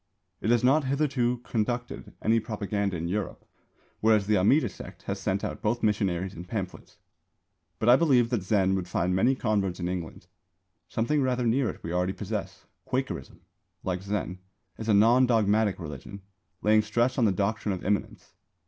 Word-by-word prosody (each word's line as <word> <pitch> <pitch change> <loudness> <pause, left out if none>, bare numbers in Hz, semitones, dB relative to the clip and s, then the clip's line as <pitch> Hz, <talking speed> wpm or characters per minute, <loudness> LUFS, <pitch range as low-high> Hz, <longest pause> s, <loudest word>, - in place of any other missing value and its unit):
It - - -1
has 120 0 +3
not 135 +3 +4
hitherto 130 -3 0
conducted 120 -2 -3
any 115 +1 +3
propaganda 100 -3 -2
in 85 +1 -3
Europe, 100 +2 -3 0.5
whereas 110 -2 +3
the 105 +1 +2
Amida 120 +8 +4
Sect 95 - -11
has 100 0 -4
sent 95 0 -1
out - - -4
both 115 +2 -1
missionaries 95 -3 0
and 90 0 -9
pamphlets. 95 -3 -6 0.8
But 110 - -2
I 120 - +9
believe 130 -7 +3
that 120 -5 +1
Zen 95 0 +2
would 95 -2 -2
find 90 0 0
many 125 +8 +3
converts 100 -6 -1
in 90 - -2
England. 90 -1 -5 0.6
Something 140 +6 0
rather 125 -2 0
near 120 +1 +2
it - - -8
we 85 - -4
already 90 +1 0
possess. - - -5 0.2
Quakerism, - - -4 0.4
like 90 -1 -2
Zen, 95 -2 -3 0.4
is 110 0 -4
a 105 - +5
non 120 +5 +5
dogmatic 110 -3 +2
religion, 85 +5 -8 0.4
laying 110 0 +5
stress 120 +5 0
on 120 - +4
the 105 - +4
doctrine 105 +3 -1
of 90 - -9
Immanence. 105 +1 -2
105 Hz, 170 wpm, -27 LUFS, 95-120 Hz, 0.8 s, I